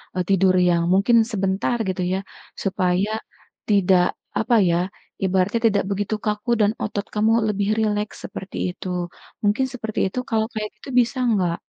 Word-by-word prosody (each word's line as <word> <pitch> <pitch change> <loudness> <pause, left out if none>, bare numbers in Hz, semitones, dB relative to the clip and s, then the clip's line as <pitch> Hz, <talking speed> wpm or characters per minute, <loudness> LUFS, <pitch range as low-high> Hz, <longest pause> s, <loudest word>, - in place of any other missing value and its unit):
eee, 180 - 0
tidur 190 -1 +4
yang 170 -1 +2
mungkin 200 +5 +4 0.2
sebentar 195 +3 0
gitu 185 0 -2
ya, 190 - 0 0.4
supaya 190 +1 +1 0.6
tidak 190 -3 +4 0.4
apa 230 +2 +2
ya 170 - +2 0.5
ibaratnya 190 +3 +2
tidak 205 -3 +1
begitu 205 +2 -1
kaku 210 +2 -2
dan 205 0 +4
otot 205 -1 -3
kamu 215 +1 +3 0.2
lebih 200 0 0
rileks 210 -1 -1
seperti 190 - -8
itu. 180 - -8 0.6
Mungkin 210 +6 +2
seperti 220 -3 -4
itu 250 - -2
kalau 220 -2 +1
kayak 215 -1 -3
gitu 215 - -11
bisa 245 +2 -2
nggak? 180 -5 +1
205 Hz, 155 wpm, -22 LUFS, 190-215 Hz, 0.6 s, tidur